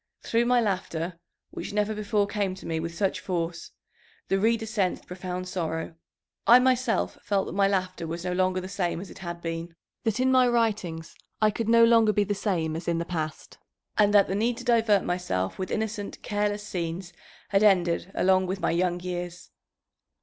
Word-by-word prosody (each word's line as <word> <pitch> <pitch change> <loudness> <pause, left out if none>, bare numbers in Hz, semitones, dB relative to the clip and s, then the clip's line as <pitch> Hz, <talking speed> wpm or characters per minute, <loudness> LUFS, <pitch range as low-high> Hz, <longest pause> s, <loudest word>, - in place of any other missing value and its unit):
Through 230 +1 +1
my 250 0 +4
laughter, 180 -5 -2 0.3
which - - -6
never 210 +1 +1
before 210 -1 0
came 200 -2 -2
to 190 - -12
me 160 -1 -2
with 165 +1 -5
such 195 +2 0
force, 170 -2 -3 0.6
the 195 - +2
reader 225 +2 +2
sensed 205 -4 -1
profound 180 0 -5
sorrow. 165 -3 -3 0.5
I 240 - +10
myself 255 -2 +1
felt 200 -2 0
that - - -6
my 195 +1 +3
laughter 185 -3 -1
was 170 +2 -5
no 180 - -1
longer 185 0 +1
the 185 - -6
same 185 -4 -2
as 190 - -8
it - - -12
had 170 -2 -6
been, 165 0 -4 0.3
that 225 +1 0
in 260 0 +3
my 255 -1 +5
writings 210 -9 0 0.3
I 215 -1 +4
could 225 +1 -3
no 230 0 +7
longer 230 -2 +5
be 205 - +3
the 205 +1 -1
same 180 -6 -1
as 165 +1 -6
in 170 -1 +1
the 170 - -2
past, 155 -3 -5 0.4
and 205 -1 +4
that 205 -1 +5
the - - -2
need 230 +4 0
to 250 - -7
divert 225 -5 +3
myself 175 - -2
with 185 - -3
innocent, 215 -2 -3
careless 205 0 -1
scenes 175 0 -4 0.4
had 195 -1 +3
ended 180 -4 +3
along 185 0 +3
with 190 +1 -3
my 170 - +1
young 175 +1 +1
years." 180 -1 -5
190 Hz, 195 wpm, -27 LUFS, 175-215 Hz, 0.6 s, I